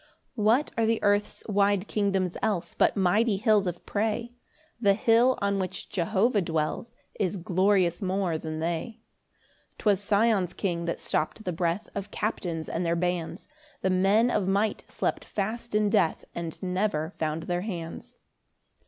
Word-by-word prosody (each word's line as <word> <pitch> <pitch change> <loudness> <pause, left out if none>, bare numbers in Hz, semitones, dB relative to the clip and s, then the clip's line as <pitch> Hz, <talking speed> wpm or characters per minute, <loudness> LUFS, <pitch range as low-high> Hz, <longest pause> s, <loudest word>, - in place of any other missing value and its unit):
4 215 - -2
What 245 +7 +3
are 225 - +3
the 225 0 +2
earth's 205 0 +1
wide 200 -1 +2
kingdoms 195 -4 0
else 175 -5 -1
But - - +2
mighty 200 +3 +3
hills 210 -2 +3
of 175 -1 -5
prey? 225 +3 -1 0.5
The 200 -3 +4
hill 230 +4 +4
on 200 0 +1
which 185 -1 -4
Jehovah 205 +4 +1
dwells 160 +7 -2 0.3
Is 190 0 0
glorious 185 0 +2
more 185 -4 0
than 155 0 -5
they. 175 +8 -3 0.7
5 - - -44
'Twas 205 -2 +1
Sion's 205 -3 +2
King 170 -4 -2
that 170 - -2
stopt 155 +7 -2
the 180 - -2
breath 170 +3 -1
Of 200 0 -5
captains 175 -8 -3
and 170 - -2
their 170 0 +1
bands: 175 -1 -2 0.4
The 190 - +2
men 200 +6 +3
of 205 -5 0
might 200 +3 +1
slept - - -2
fast 220 +3 -3
in 210 -1 +3
death, 195 -7 +2
And 165 -2 -5
never 180 -4 -1
found 160 -2 -3
their 175 0 -1
hands. 175 -5 -6
195 Hz, 160 wpm, -27 LUFS, 175-215 Hz, 0.7 s, The